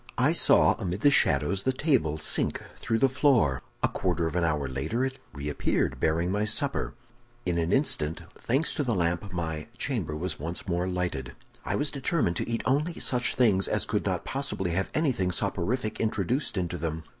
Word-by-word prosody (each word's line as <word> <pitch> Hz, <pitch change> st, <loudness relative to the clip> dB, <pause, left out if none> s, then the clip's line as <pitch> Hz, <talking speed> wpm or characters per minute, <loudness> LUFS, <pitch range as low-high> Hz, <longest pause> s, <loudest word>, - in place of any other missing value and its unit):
I -, -, +3 dB
saw, -, -, +6 dB
amid 90 Hz, +3 st, -3 dB
the 145 Hz, -, +6 dB
shadows, 75 Hz, -, +3 dB
the 130 Hz, -, +1 dB
table 130 Hz, -, +1 dB
sink -, -, -1 dB, 0.2 s
through 115 Hz, -, -1 dB
the 135 Hz, -, +4 dB
floor; 130 Hz, -, +3 dB, 0.2 s
a -, -, +5 dB
quarter 90 Hz, -3 st, -1 dB
of 80 Hz, -, -3 dB
an 90 Hz, -, +1 dB
hour 75 Hz, -4 st, 0 dB
later 75 Hz, -, -1 dB
it 135 Hz, 0 st, -5 dB
reappeared, 70 Hz, +1 st, -1 dB
bearing 85 Hz, +3 st, +1 dB
my 105 Hz, +2 st, +1 dB
supper. 140 Hz, +6 st, +1 dB, 0.5 s
In 85 Hz, -2 st, 0 dB
an 85 Hz, +1 st, 0 dB
instant, 85 Hz, -, +1 dB
thanks 135 Hz, +7 st, 0 dB
to 150 Hz, -, -1 dB
the 120 Hz, -5 st, 0 dB
lamp, 85 Hz, +2 st, -1 dB
my 80 Hz, -3 st, -3 dB
chamber 100 Hz, -, -2 dB
was 90 Hz, +5 st, -3 dB
once 85 Hz, +6 st, -5 dB
more 90 Hz, 0 st, 0 dB
lighted. 90 Hz, -9 st, -3 dB, 0.3 s
"I -, -, -1 dB
was 145 Hz, 0 st, 0 dB
determined 140 Hz, -, 0 dB
to -, -, -2 dB
eat 115 Hz, -, -1 dB
only 150 Hz, +6 st, 0 dB
such 125 Hz, -1 st, 0 dB
things 105 Hz, -7 st, +3 dB
as -, -, 0 dB
could -, -, -1 dB
not -, -, -1 dB
possibly 130 Hz, -10 st, -2 dB
have 95 Hz, +3 st, -1 dB
anything 130 Hz, -, +1 dB
soporific 105 Hz, +5 st, -1 dB
introduced 110 Hz, -, 0 dB
into 90 Hz, -1 st, -2 dB
them. 80 Hz, 0 st, -3 dB
95 Hz, 185 wpm, -28 LUFS, 85-130 Hz, 0.5 s, saw